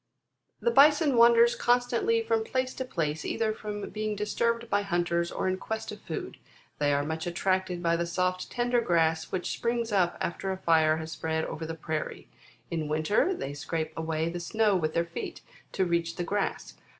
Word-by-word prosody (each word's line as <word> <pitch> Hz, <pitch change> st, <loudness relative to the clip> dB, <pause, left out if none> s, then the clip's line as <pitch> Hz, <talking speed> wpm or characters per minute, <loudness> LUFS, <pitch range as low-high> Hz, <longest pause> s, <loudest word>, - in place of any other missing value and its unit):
18. -, -, -11 dB
"The 475 Hz, -, +4 dB
Bison 295 Hz, -1 st, +6 dB
wanders 235 Hz, 0 st, +6 dB
constantly 245 Hz, -, +2 dB
from 450 Hz, 0 st, +1 dB
place 255 Hz, -10 st, -1 dB
to 260 Hz, -, -4 dB
place, 160 Hz, -11 st, -2 dB
either 220 Hz, -1 st, 0 dB
from 210 Hz, -1 st, -5 dB
being 215 Hz, 0 st, -2 dB
disturbed 230 Hz, +3 st, 0 dB
by 205 Hz, -2 st, +1 dB
hunters, 175 Hz, -2 st, 0 dB
or -, -, -2 dB
in 185 Hz, 0 st, 0 dB
quest 220 Hz, +1 st, -4 dB
of 210 Hz, -, -9 dB
food. 160 Hz, -, -6 dB, 0.4 s
They 145 Hz, -1 st, +2 dB
are 140 Hz, 0 st, +2 dB
much 160 Hz, +2 st, -3 dB
attracted 185 Hz, 0 st, -1 dB
by 170 Hz, 0 st, +3 dB
the 170 Hz, 0 st, -1 dB
soft 185 Hz, +1 st, -1 dB
tender 245 Hz, 0 st, +1 dB
grass, 165 Hz, -5 st, +1 dB
which 185 Hz, -1 st, -2 dB
springs 235 Hz, -1 st, -1 dB
up 185 Hz, -4 st, +2 dB
after 190 Hz, +3 st, -2 dB
a 190 Hz, -, -3 dB
fire 160 Hz, -3 st, +3 dB
has 160 Hz, 0 st, -6 dB
spread 160 Hz, +1 st, -2 dB
over 160 Hz, 0 st, -5 dB
the 165 Hz, -, -4 dB
prairie. 155 Hz, -1 st, -4 dB, 0.4 s
In 160 Hz, -3 st, -2 dB
winter, 155 Hz, -, +2 dB
they 140 Hz, -, -5 dB
scrape 155 Hz, +2 st, -4 dB
away 160 Hz, 0 st, -1 dB
the 175 Hz, +1 st, -3 dB
snow 210 Hz, +3 st, +2 dB
with 155 Hz, -3 st, -1 dB
their 170 Hz, 0 st, +2 dB
feet, 170 Hz, 0 st, -6 dB, 0.3 s
to 190 Hz, -, +1 dB
reach 170 Hz, -1 st, 0 dB
the 175 Hz, -, -2 dB
grass. 205 Hz, +4 st, -2 dB
185 Hz, 190 wpm, -28 LUFS, 160-230 Hz, 0.4 s, Bison